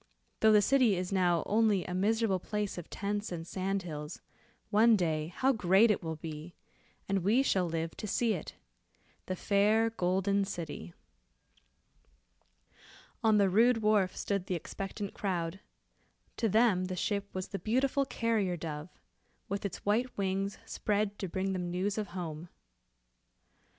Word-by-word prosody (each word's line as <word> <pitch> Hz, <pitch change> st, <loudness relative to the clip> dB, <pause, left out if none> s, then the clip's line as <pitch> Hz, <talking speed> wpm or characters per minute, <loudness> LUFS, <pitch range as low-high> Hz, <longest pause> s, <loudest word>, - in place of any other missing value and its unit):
Though 220 Hz, -, +5 dB
the 210 Hz, -1 st, +6 dB
city 255 Hz, -6 st, +4 dB
is 180 Hz, +1 st, -3 dB
now 175 Hz, -4 st, +2 dB
only 210 Hz, -3 st, +2 dB
a 180 Hz, -, -5 dB
miserable 205 Hz, +1 st, +1 dB
place 210 Hz, -1 st, -3 dB
of 170 Hz, -, -10 dB
tents 205 Hz, +1 st, -3 dB
and 165 Hz, -2 st, -5 dB
sand 190 Hz, +2 st, -2 dB
hills, 150 Hz, -2 st, -6 dB, 0.5 s
one 225 Hz, +2 st, +6 dB
day 160 Hz, -5 st, 0 dB
how 260 Hz, +10 st, +1 dB
great 205 Hz, +1 st, +4 dB
it 210 Hz, -, 0 dB
will 160 Hz, -2 st, -4 dB
be, 155 Hz, +1 st, -8 dB, 0.5 s
and 195 Hz, 0 st, +1 dB
we 215 Hz, +9 st, +3 dB
shall 185 Hz, -9 st, +1 dB
live 165 Hz, 0 st, -3 dB
to 215 Hz, -, -5 dB
see 230 Hz, +2 st, +1 dB
it. 175 Hz, -, -6 dB, 0.7 s
The 185 Hz, -, -2 dB
fair 215 Hz, +4 st, +2 dB
Golden 195 Hz, 0 st, +1 dB
City." 165 Hz, -, -6 dB, 2.3 s
On 220 Hz, -1 st, +5 dB
the 200 Hz, -1 st, +4 dB
rude 225 Hz, +4 st, +4 dB
wharf 210 Hz, -3 st, +2 dB
stood 200 Hz, -2 st, -2 dB
the 185 Hz, -, -1 dB
expectant 195 Hz, +4 st, -5 dB
crowd. 180 Hz, -2 st, -2 dB, 0.8 s
To 225 Hz, -, +1 dB
them 215 Hz, -4 st, +3 dB
the 185 Hz, 0 st, -4 dB
ship 200 Hz, +2 st, -2 dB
was 185 Hz, 0 st, -5 dB
the 195 Hz, -, -4 dB
beautiful 260 Hz, +5 st, +1 dB
carrier 220 Hz, -8 st, 0 dB
dove, 155 Hz, 0 st, -6 dB, 0.6 s
with 200 Hz, +1 st, -3 dB
its 195 Hz, -, -5 dB
white 235 Hz, +5 st, 0 dB
wings 195 Hz, 0 st, -1 dB
spread 205 Hz, -1 st, -1 dB
to 190 Hz, -, -3 dB
bring 190 Hz, +2 st, -1 dB
them 180 Hz, -2 st, -3 dB
news 195 Hz, +4 st, -1 dB
of 210 Hz, -, -3 dB
home. 170 Hz, -3 st, -6 dB
195 Hz, 150 wpm, -31 LUFS, 180-215 Hz, 2.3 s, the